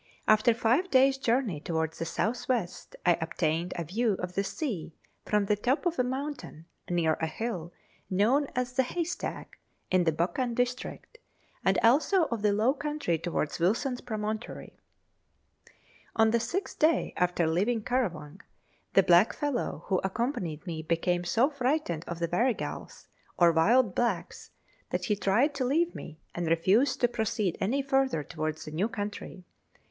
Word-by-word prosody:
After 215 +2 +5
five 245 +11 +2
days' 270 -1 +4
journey 235 - 0
towards 160 0 -2
the 165 - -2
south 245 +8 -2
west, 225 -9 -2
I 175 -1 +4
obtained 165 +1 -1
a 170 - -2
view 215 +7 0
of 180 0 -5
the 195 - 0
sea 195 - -4 0.3
from 210 -1 +1
the 210 - +2
top 255 - 0
of 345 -4 0
a - - +4
mountain, 260 - -5 0.2
near 170 -3 +2
a 160 - +1
hill 175 -2 -4 0.4
known 235 +10 +2
as 250 0 -1
the 260 - +3
Haystack, 340 +7 -4 0.3
in 185 -1 +3
the 160 - +4
Buchan 230 - -1
district, 250 - -3 0.4
and - - +3
also 305 - +4
of 230 -3 -2
the 210 -1 +3
low 220 +6 +3
country 295 - -2
towards 165 -2 -2
Wilson's 235 - 0
Promontory. 215 0 -5 1.4
On 220 0 +4
the 235 - +3
sixth 350 - -3
day 315 +1 +2
after 180 -1 +1
leaving 205 +8 +1
Currawang 190 - -2 0.5
the 195 - +6
blackfellow 225 +10 +2
who 190 -2 +1
accompanied 190 - -2
me 165 -3 -4
became 170 +2 0
so 230 +9 +3
frightened 260 - -1
of 170 - -4
the 170 0 -1
Warrigals, 230 +8 -2 0.3
or 170 -1 +6
wild 205 +6 +3
blacks, 195 -8 -2 0.4
that - - -2
he 210 - +1
tried 220 +9 +2
to 275 -2 -2
leave 330 +7 +1
me, 155 - -9 0.2
and 175 -1 -3
refused 190 - +2
to 245 - +5
proceed 215 -5 -1
any 255 +9 +1
further 270 - +1
towards 155 +1 -4
the 155 - -7
new 185 +9 0
country. 205 -3 -6
215 Hz, 155 wpm, -29 LUFS, 175-255 Hz, 1.4 s, the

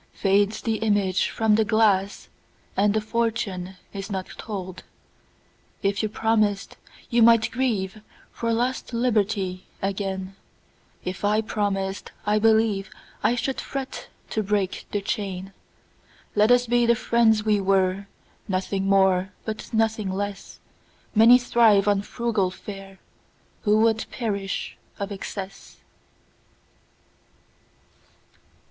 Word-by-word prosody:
Fades 200 +2 +2
the 225 -2 0
image 205 -4 +1
from 220 -1 +1
the 220 +1 +4
glass, 205 -2 +2 0.5
And 205 +1 +2
the 220 - +2
fortune 215 -5 -2 0.2
is 200 0 -6
not 190 -2 -3
told. 190 -4 -6 1.0
If 200 0 +1
you 215 - -1
promised, 215 -2 0 0.4
you 235 0 +3
might 230 -1 +5
grieveFor 215 -5 -1 0.5
lost 245 +2 -1
liberty 205 -6 0
again:If 190 -1 -6
I 210 +1 +3
promised, 200 -3 -2
I 210 0 +2
believeI 220 +1 +1
should 265 +2 -2
fret 270 -1 -6 0.2
to 220 - 0
break 200 -2 -1
the 205 - -1
chain. 195 -2 -4 0.8
Let 210 +1 +4
us 245 0 +5
be 240 0 +2
the 235 - +5
friends 220 -2 +2
we 210 -2 +2
were, 195 0 +1 0.4
Nothing 190 0 -1
more 190 -1 +3
but 220 -1 -5
nothing 220 -2 +1
less:Many 205 +4 +1
thrive 225 -5 +4
on 200 -1 +3
frugal 215 -3 -1
fareWho 195 +1 -10 0.7
would 220 +1 +3
perish 200 -5 -3 0.2
of 200 0 -4
excess. 195 0 -7
205 Hz, 105 wpm, -24 LUFS, 195-225 Hz, 1.0 s, might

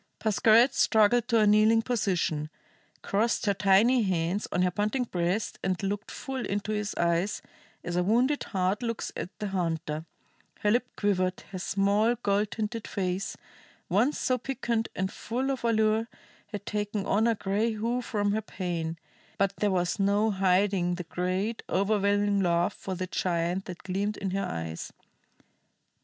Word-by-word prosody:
Pascherette 225 +4 +4
struggled 225 0 +3
to 235 -2 +3
a 215 - +5
kneeling 215 +2 +5
position, 180 -10 0 0.5
crossed 225 +4 +1
her 200 - +3
tiny 205 +6 +4
hands 185 0 0
on 180 - +1
her 180 - +2
panting 210 +7 0
breast, 180 -1 -2
and 185 -1 0
looked 205 +2 -2
full 265 -2 -5
into 205 +1 -2
his 210 -1 -2
eyes 170 +3 0 0.4
as 175 - -3
a 180 - +3
wounded 245 +9 +2
hart 190 +1 0
looks 230 -2 -3
at - - -4
the 210 - -3
hunter. 165 -4 -2 0.5
Her 210 - +3
lip 245 +2 +2
quivered, 185 -3 0
her 185 - -5
small, 200 +5 +2
gold 205 -2 0
tinted 220 +1 -4
face, 185 0 -2 0.5
once 230 +11 +2
so 255 -1 0
piquant 235 -3 -2
and 190 +1 -1
full 255 +5 -2
of 265 -3 -4
allure, 220 -1 +2 0.4
had 205 -1 -7
taken 210 -1 -2
on 220 +3 +2
a 230 - +2
gray 205 +3 0
hue 230 +3 -1
from 205 -4 -1
her 215 +1 0
pain, 170 -5 -4 0.4
but 195 0 +1
there 210 - +1
was 180 +1 0
no 205 +2 +3
hiding 190 -1 +2
the 180 - -5
great, 185 +6 -2
overwhelming 200 +1 +2
love 175 +1 +2
for 190 - -5
the 185 +1 -3
giant 175 +1 -1
that 180 -2 -8
gleamed 200 +3 -2
in 195 -2 -3
her 195 +1 -1
eyes. 80 - -5
205 Hz, 160 wpm, -28 LUFS, 185-220 Hz, 0.5 s, a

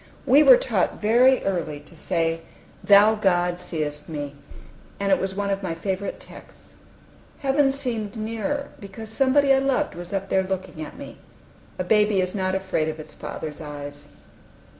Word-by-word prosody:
We 275 +2 +6
were - - +9
taught - - -1
very 245 +5 +4
early 170 -6 -2
to 150 +3 -15
say 165 -1 -1 0.4
"Thou, 205 +2 +7
God, 180 -4 +1
seest 155 -4 -4
me"; 145 -3 -5 0.7
and 200 0 0
it 190 - +4
was 190 0 -3
one 200 0 -1
of 195 0 -1
my 175 -4 -3
favorite 190 +3 -3
texts. - - -15 0.7
Heaven 275 0 +3
seemed 240 -7 -3
nearer, 230 +6 -3
because 205 +2 -9
somebody 270 +3 +3
I 270 - +4
loved 270 -1 0
was 175 +1 -9
up 195 -1 -3
there 190 - +3
looking 185 -4 -4
at - - -10
me. - - -10 0.6
A - - -1
baby 210 +1 +3
is 185 0 0
not 185 -1 -1
afraid 190 -5 -1
of 155 0 -6
its 155 - -10
father's 155 0 -7
eyes. 145 -1 -8
195 Hz, 165 wpm, -24 LUFS, 170-225 Hz, 0.7 s, were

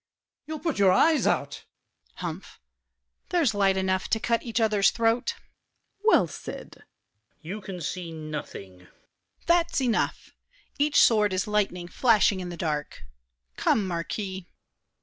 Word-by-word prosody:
You'll 315 0 -4
put 310 -6 -3
your 195 -2 +5
eyes 315 - +4
out. - - 0
DIDIER. - - -16
Humph! 175 +1 -7 0.7
There's 325 -10 +2
light 195 -2 +2
enough 190 0 0
to 225 - +1
cut 230 +1 0
each 235 -1 -2
other's 210 -3 +3
throat. 230 +1 0
SAVERNY. - - -28 0.6
Well 445 - +5
said! - - -8
VILLAC. - - -20 0.6
You 195 +7 -6
can 190 -2 -7
see 170 +1 -4
nothing. 150 - -7
DIDIER. 90 - -21 0.5
That's 340 -2 +2
enough! 245 -4 -1 0.5
Each 290 0 +3
sword 210 -4 +4
is 185 0 0
lightning 200 -4 -1
flashing 210 -2 +3
in 180 -1 -5
the 175 - -7
dark. 150 -3 -3 0.5
Come, 210 - +2
Marquis! 185 +2 -4
195 Hz, 145 wpm, -26 LUFS, 180-230 Hz, 0.7 s, your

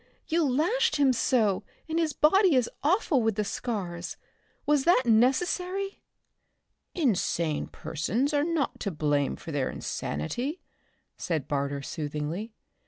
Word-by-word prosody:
You 335 +1 +2
lashed 360 - +2
him 280 -3 +4
so, 220 -5 +2 0.3
and 320 +1 0
his 320 -2 +1
body 355 +3 +4
is 250 -2 +3
awful 320 - +2
with 225 -2 +1
the 210 - 0
scars. 185 -6 -4 0.5
Was 295 -2 +3
that 340 -7 +5
necessary?" 360 - +1 0.9
"Insane 175 - 0
persons 220 - -2
are 290 0 +3
not 325 -4 -1
to 200 - -2
blame 145 -4 0
for 165 - -8
their 140 -3 0
insanity," 245 - -3 0.6
said 160 -6 -2
Barter 140 -1 -2
soothingly. 155 +10 -4
240 Hz, 125 wpm, -28 LUFS, -, 0.9 s, that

